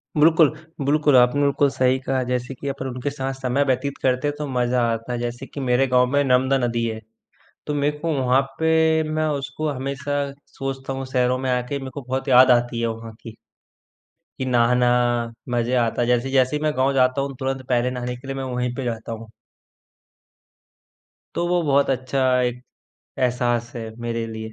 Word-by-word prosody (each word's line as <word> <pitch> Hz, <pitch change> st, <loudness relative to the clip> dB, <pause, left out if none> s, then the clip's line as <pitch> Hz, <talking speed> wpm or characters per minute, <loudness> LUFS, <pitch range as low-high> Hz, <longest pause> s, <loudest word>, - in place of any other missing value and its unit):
बिल्कुल, 160 Hz, 0 st, +5 dB, 0.4 s
बिल्कुल, 150 Hz, 0 st, +3 dB
आपने 125 Hz, +3 st, +4 dB
बिल्कुल 140 Hz, 0 st, +3 dB
सही 130 Hz, -1 st, +2 dB
कहा। 130 Hz, 0 st, -1 dB
जैसे 125 Hz, +1 st, -2 dB
कि 140 Hz, -, -7 dB
अपन 135 Hz, -1 st, -4 dB
उनके 125 Hz, +2 st, -3 dB
साथ 135 Hz, -1 st, -4 dB
समय 135 Hz, +1 st, 0 dB
व्यतीत 135 Hz, +1 st, -1 dB
करते 130 Hz, +2 st, +1 dB
हैं 145 Hz, -, -2 dB
तो 150 Hz, -, -4 dB
मज़ा 125 Hz, -1 st, 0 dB
आता 115 Hz, +2 st, -4 dB
है। 120 Hz, -, -2 dB
जैसे 120 Hz, +2 st, -4 dB
कि 140 Hz, -, -9 dB
मेरे 125 Hz, +2 st, +3 dB
गाँव 125 Hz, 0 st, +4 dB
में 145 Hz, 0 st, +3 dB
नर्मदा 130 Hz, 0 st, +3 dB
नदी 115 Hz, -1 st, -1 dB
है, 110 Hz, -1 st, -4 dB, 0.7 s
तो 150 Hz, -, -2 dB
मेरे 145 Hz, +1 st, 0 dB
को 165 Hz, +2 st, -1 dB
वहाँ 130 Hz, +1 st, +3 dB, 0.2 s
पे 160 Hz, 0 st, +3 dB
मैं 155 Hz, 0 st, 0 dB, 0.2 s
उसको 140 Hz, +3 st, -4 dB
हमेशा 140 Hz, +1 st, -3 dB, 0.4 s
सोचता 135 Hz, 0 st, -4 dB
हूँ, 135 Hz, 0 st, -4 dB
शहरों 125 Hz, -1 st, +2 dB
में 130 Hz, 0 st, -2 dB
आके 125 Hz, +3 st, -1 dB
मेरे 135 Hz, -1 st, -7 dB
को 140 Hz, -, -6 dB
बहुत 130 Hz, +2 st, -3 dB
याद 130 Hz, 0 st, +7 dB
आती 120 Hz, -1 st, +2 dB
है 115 Hz, -, +1 dB
वहाँ 115 Hz, 0 st, -10 dB
की। 115 Hz, -1 st, -10 dB, 1.0 s
कि 130 Hz, -, -2 dB
नहाना, 125 Hz, 0 st, +3 dB, 0.6 s
मज़े 120 Hz, 0 st, 0 dB
आता 115 Hz, +1 st, -1 dB
है। 120 Hz, -, +1 dB
जैसे 125 Hz, +2 st, +1 dB
जैसे 130 Hz, +1 st, +3 dB
ही 150 Hz, -, -2 dB
मैं 155 Hz, -, +2 dB
गाँव 135 Hz, +1 st, +2 dB
जाता 130 Hz, +1 st, +2 dB
हूँ, 135 Hz, 0 st, -4 dB
तुरंत 135 Hz, -1 st, -3 dB
पहले 125 Hz, 0 st, +2 dB
नहाने 125 Hz, 0 st, -4 dB
के 130 Hz, +2 st, -13 dB
लिए 135 Hz, -, -4 dB
मैं 135 Hz, -, -4 dB
वहीं 125 Hz, -1 st, -2 dB
पे 135 Hz, -, -4 dB
जाता 115 Hz, -1 st, -4 dB
हूँ। 115 Hz, 0 st, -7 dB, 2.1 s
तो 175 Hz, -, 0 dB
वो 175 Hz, 0 st, +2 dB
बहुत 140 Hz, -2 st, +2 dB
अच्छा 130 Hz, +1 st, 0 dB, 0.2 s
एक 125 Hz, 0 st, -2 dB, 0.6 s
एहसास 120 Hz, -2 st, 0 dB
है 115 Hz, -1 st, -5 dB
मेरे 115 Hz, -1 st, -2 dB
लिए। 110 Hz, 0 st, -7 dB
130 Hz, 195 wpm, -22 LUFS, 125-140 Hz, 2.1 s, याद